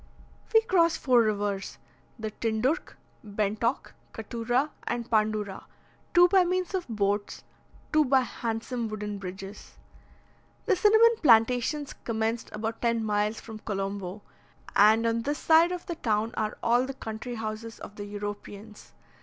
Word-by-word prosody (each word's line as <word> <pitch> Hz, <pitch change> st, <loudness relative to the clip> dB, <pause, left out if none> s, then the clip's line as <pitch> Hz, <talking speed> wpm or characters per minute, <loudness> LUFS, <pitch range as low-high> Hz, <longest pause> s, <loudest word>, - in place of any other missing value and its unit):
We 445 Hz, -, +6 dB
crossed 340 Hz, -7 st, +3 dB
four 250 Hz, -3 st, +4 dB
rivers, 205 Hz, -3 st, -2 dB, 0.4 s
the 220 Hz, -2 st, -4 dB
Tindurch, 230 Hz, -, -1 dB, 0.3 s
Bentock, 215 Hz, +3 st, -2 dB, 0.2 s
Cattura, 240 Hz, +6 st, -1 dB, 0.2 s
and 235 Hz, -1 st, -2 dB
Pandura, 215 Hz, -3 st, 0 dB, 0.5 s
two 350 Hz, 0 st, +8 dB
by 380 Hz, 0 st, +5 dB
means 365 Hz, +1 st, -1 dB
of 370 Hz, -2 st, -2 dB
boats, 205 Hz, -2 st, -1 dB, 0.5 s
two 305 Hz, 0 st, +5 dB
by 265 Hz, 0 st, +4 dB
handsome 230 Hz, 0 st, -3 dB
wooden 210 Hz, -1 st, -5 dB
bridges. 195 Hz, +2 st, -9 dB, 0.9 s
The -, -, +3 dB
cinnamon 440 Hz, +5 st, +5 dB
plantations 250 Hz, +3 st, +3 dB
commenced 225 Hz, 0 st, -2 dB
about 220 Hz, +1 st, -4 dB
ten 235 Hz, -1 st, +1 dB
miles 210 Hz, +1 st, 0 dB
from 220 Hz, -2 st, -9 dB
Colombo; 195 Hz, -1 st, -4 dB, 0.5 s
and 220 Hz, +3 st, +5 dB
on 230 Hz, 0 st, +1 dB
this 290 Hz, +5 st, -2 dB
side 325 Hz, +2 st, +5 dB
of 360 Hz, -1 st, -5 dB
the 345 Hz, -, -3 dB
town 220 Hz, -4 st, 0 dB
are 215 Hz, -1 st, -2 dB
all 240 Hz, +2 st, +3 dB
the 270 Hz, -, -6 dB
country 225 Hz, +1 st, -6 dB
houses 220 Hz, 0 st, -5 dB
of 205 Hz, -, -10 dB
the 205 Hz, -, -6 dB
Europeans. 205 Hz, +1 st, -8 dB
225 Hz, 135 wpm, -27 LUFS, 210-260 Hz, 0.9 s, two